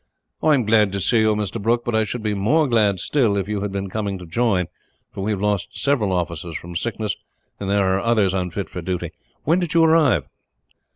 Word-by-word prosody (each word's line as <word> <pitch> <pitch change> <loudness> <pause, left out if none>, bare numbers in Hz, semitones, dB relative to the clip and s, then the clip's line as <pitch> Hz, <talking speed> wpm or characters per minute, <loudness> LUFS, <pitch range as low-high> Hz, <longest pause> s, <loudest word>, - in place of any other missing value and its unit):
"I 155 -1 +4
am 125 -5 0
glad 105 -2 +4
to 100 - -1
see 115 +4 +2
you, 110 -1 +3
Mr. 105 +1 -3
Brooke; 120 +3 +1
but 120 - -2
I 110 0 +2
should 110 +2 -5
be 105 -1 0
more 125 +11 +2
glad, 105 -6 +2
still, 115 -9 +1
if 95 -1 -2
you 105 -1 -2
had 100 -1 -3
been 100 0 -3
coming 100 0 -3
to 90 - -10
join, 95 0 +1 0.5
for - - -5
we 100 - -1
have 105 -3 -1
lost 105 -2 -1
several 130 -8 +1
officers 85 -2 -3
from 85 0 -9
sickness, 110 +2 -2 0.4
and 100 - -4
there 100 -1 +2
are 95 0 +2
others 105 -3 +2
unfit 95 +1 -2
for 90 - -7
duty. 90 -1 -3 0.3
When 165 +5 +3
did 175 -3 -3
you 165 - +6
arrive?" 155 - +4
105 Hz, 225 wpm, -22 LUFS, 95-115 Hz, 0.5 s, you